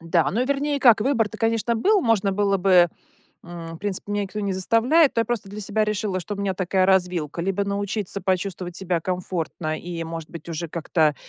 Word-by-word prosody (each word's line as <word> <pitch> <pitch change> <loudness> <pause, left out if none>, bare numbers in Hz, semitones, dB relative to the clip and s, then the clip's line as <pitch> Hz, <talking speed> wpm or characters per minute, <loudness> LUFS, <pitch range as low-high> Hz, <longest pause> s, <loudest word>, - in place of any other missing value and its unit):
Да, 165 -3 +1
ну 235 +6 0
вернее 280 +1 0
как, 235 -5 +6
выбор-то, 225 -3 0
конечно, 230 +1 +1
был, 400 - +3
можно 215 - +2
было 200 0 +2
бы, 180 -2 +5 0.6
м, 170 -1 -8
в - - -16
принципе, 205 0 -4
меня 205 0 0
никто 200 +2 -5
не 200 -1 -1
заставляет, 235 - +3
но - - +4
я 230 - +1
просто 235 -5 -3
для 210 +2 -7
себя 215 +2 0
решила, 210 -3 -2
что 180 +4 -5
у - - -10
меня 200 -2 -1
такая 185 0 +1
развилка: 180 -5 +1
либо 195 +2 0
научиться 200 0 -3
почувствовать 185 -1 -2
себя 180 -3 -1
комфортно 170 -3 -3
и, 170 -1 -5
может 165 -1 -7
быть, 165 0 -10
уже 165 0 -4
как-то, 155 -2 +1
195 Hz, 200 wpm, -23 LUFS, 175-215 Hz, 0.6 s, как